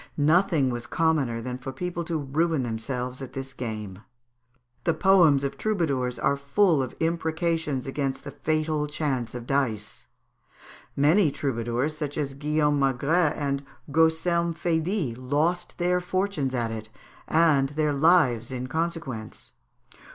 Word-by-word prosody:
Nothing 155 Hz, -2 st, +3 dB
was 120 Hz, -1 st, -5 dB
commoner 150 Hz, -8 st, +1 dB
than 125 Hz, +1 st, -5 dB
for 135 Hz, +1 st, -6 dB
people 175 Hz, +5 st, -4 dB
to 165 Hz, -1 st, -1 dB
ruin 155 Hz, +1 st, 0 dB
themselves 125 Hz, +2 st, -4 dB
at 135 Hz, -, -7 dB
this 135 Hz, 0 st, -6 dB
game. 110 Hz, -6 st, -5 dB, 0.8 s
The 165 Hz, -, +1 dB
poems 165 Hz, -7 st, +5 dB
of 140 Hz, -, -3 dB
troubadours 140 Hz, -, 0 dB
are 140 Hz, -, +2 dB
full 145 Hz, +3 st, +2 dB
of 130 Hz, -, -4 dB
imprecations 160 Hz, -3 st, -1 dB
against 135 Hz, 0 st, -3 dB
the -, -, -7 dB
fatal 155 Hz, -1 st, -1 dB
chance 140 Hz, -6 st, -2 dB
of 120 Hz, -1 st, -6 dB
dice; 115 Hz, -6 st, -2 dB, 0.9 s
many 155 Hz, +5 st, +4 dB
troubadours, 130 Hz, +1 st, -2 dB
such 150 Hz, -2 st, -4 dB
as 140 Hz, -3 st, -2 dB
Guillaume 150 Hz, +1 st, +1 dB
Magret 140 Hz, +5 st, +2 dB
and 140 Hz, -1 st, -2 dB, 0.3 s
Gaucelm 165 Hz, +2 st, +2 dB
Faydit, 165 Hz, -, -1 dB
lost 155 Hz, +7 st, -1 dB
their 180 Hz, 0 st, +2 dB
fortunes 180 Hz, -7 st, -1 dB
at 115 Hz, -2 st, -1 dB
it, 110 Hz, -1 st, -6 dB, 0.4 s
and 155 Hz, -4 st, +3 dB
their 150 Hz, 0 st, 0 dB
lives 140 Hz, -6 st, +3 dB
in 125 Hz, -1 st, -4 dB
consequence. 155 Hz, -6 st, -4 dB
145 Hz, 135 wpm, -26 LUFS, 130-165 Hz, 0.9 s, poems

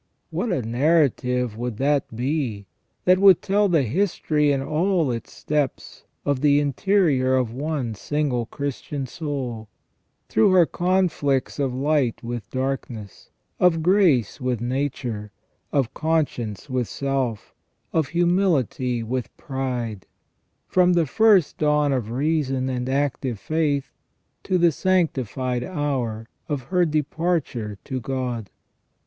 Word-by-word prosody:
What 235 Hz, -, -1 dB
a 160 Hz, -9 st, 0 dB
narrative 125 Hz, -2 st, +1 dB
would 120 Hz, -1 st, -4 dB
that 140 Hz, -3 st, 0 dB
be 125 Hz, -5 st, -2 dB, 0.4 s
that 185 Hz, 0 st, +5 dB
would 195 Hz, -3 st, +7 dB
tell 200 Hz, +1 st, +2 dB
the 165 Hz, -5 st, +3 dB
history 150 Hz, -, +1 dB
in 140 Hz, -, +1 dB
all 165 Hz, -1 st, +1 dB
its 115 Hz, -1 st, -5 dB
steps 150 Hz, -3 st, -3 dB, 0.2 s
of 140 Hz, -2 st, 0 dB
the 145 Hz, -1 st, +5 dB
interior 145 Hz, -3 st, +2 dB
of 125 Hz, -3 st, 0 dB
one 140 Hz, -3 st, -2 dB
single 125 Hz, 0 st, -1 dB
Christian 140 Hz, 0 st, -4 dB
soul, 130 Hz, -7 st, -5 dB, 0.6 s
through 110 Hz, -, +3 dB
her 180 Hz, -2 st, +6 dB
conflicts 175 Hz, -8 st, 0 dB
of 135 Hz, -2 st, +1 dB
light 140 Hz, -3 st, +1 dB
with 120 Hz, -3 st, -5 dB
darkness, 130 Hz, -6 st, -4 dB, 0.3 s
of 165 Hz, -3 st, +3 dB
grace 165 Hz, -, +3 dB
with 125 Hz, -2 st, -1 dB
nature, 120 Hz, -4 st, -3 dB, 0.4 s
of 135 Hz, -5 st, 0 dB
con 160 Hz, 0 st, +2 dB
science 110 Hz, -5 st, -7 dB
with 130 Hz, -4 st, -1 dB
self, 135 Hz, -6 st, -2 dB, 0.4 s
of 160 Hz, -4 st, +2 dB
humility 165 Hz, -, +1 dB
with 125 Hz, +2 st, -4 dB
pride, 125 Hz, -7 st, -4 dB, 0.6 s
from 180 Hz, -1 st, +4 dB
the 170 Hz, -2 st, +3 dB
first 200 Hz, +1 st, +3 dB
dawn 150 Hz, -1 st, +2 dB
of 120 Hz, -5 st, -2 dB
reason 135 Hz, 0 st, 0 dB
and 125 Hz, 0 st, -2 dB
active 135 Hz, -3 st, -1 dB
faith 150 Hz, -2 st, -1 dB, 0.5 s
to 185 Hz, -, +2 dB
the 170 Hz, -1 st, +4 dB
sanctified 130 Hz, -, 0 dB
hour 130 Hz, -10 st, -2 dB, 0.2 s
of 145 Hz, -4 st, -2 dB
her 180 Hz, +6 st, +2 dB
departure 150 Hz, -, -1 dB
to 130 Hz, -, -4 dB
God 125 Hz, -3 st, -3 dB
140 Hz, 125 wpm, -23 LUFS, 125-160 Hz, 0.6 s, would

